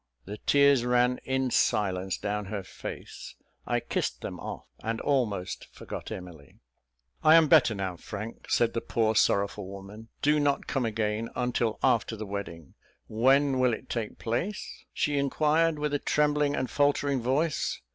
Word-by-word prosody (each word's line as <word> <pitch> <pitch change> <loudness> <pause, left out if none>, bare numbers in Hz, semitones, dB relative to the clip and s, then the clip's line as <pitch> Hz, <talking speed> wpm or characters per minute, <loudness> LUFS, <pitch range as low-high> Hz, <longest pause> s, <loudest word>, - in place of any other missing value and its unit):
The 105 +2 -7
tears 140 -3 +5
ran 125 0 +2
in 130 -1 0
silence 95 -4 +1
down 105 0 -3
her 100 0 -4
face; - - -8 0.3
I - - +1
kissed - - -3
them - - -6
off, - - -7 0.2
and 115 0 -2
almost 105 -10 -1
forgot - - -8
Emily. 85 -6 -9 0.7
"I 155 +1 +8
am 165 -1 +6
better 140 -7 +5
now, 95 -3 -3
Frank," 105 +5 -8
said 115 -1 +2
the 115 - -1
poor, 110 -1 +1
sorrowful 100 -2 +2
woman; 100 +3 -10 0.2
"do 150 +1 +4
not 145 -1 +1
come 130 -4 -1
again 110 0 -1
until 120 -2 0
after 120 -3 +2
the 110 0 -6
wedding. 95 -7 -6 0.3
When 135 +4 +3
will 125 -3 +3
it 130 - -14
take 115 -3 -3
place?" 145 - -4
she 145 -1 0
inquired, 155 +3 +2
with 150 0 -2
a 145 - +1
trembling 150 -1 +1
and 130 - -1
a - - -14
faltering 145 -2 +2
voice. 140 +6 0
120 Hz, 160 wpm, -28 LUFS, 105-140 Hz, 0.7 s, I